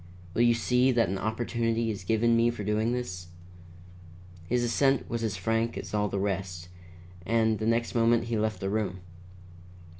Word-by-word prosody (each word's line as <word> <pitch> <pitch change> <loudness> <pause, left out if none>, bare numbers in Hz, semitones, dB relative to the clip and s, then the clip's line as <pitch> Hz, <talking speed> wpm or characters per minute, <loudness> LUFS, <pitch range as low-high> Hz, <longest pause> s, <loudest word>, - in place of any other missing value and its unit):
Will - - +1
you 120 -1 +5
see 125 +3 +2
that 115 -6 +2
an 95 0 -2
opportunity 115 0 -1
is 100 -3 -6
given 115 +4 +2
me 115 +1 +4
for 120 -3 -4
doing 105 +3 0
this?" 90 -8 -4 1.2
His 120 0 +1
assent 135 +2 +2
was 115 -1 -3
as 110 -3 -2
frank 115 +4 -1
as - - -7
all 105 -1 +1
the 100 - -3
rest, 95 -3 -3 0.5
and 110 +1 +1
the 110 - -1
next 115 +1 +1
moment 115 0 +3
he 115 0 -2
left 110 0 -1
the 95 - -1
room. 100 -4 -2
115 Hz, 175 wpm, -28 LUFS, 105-115 Hz, 1.2 s, you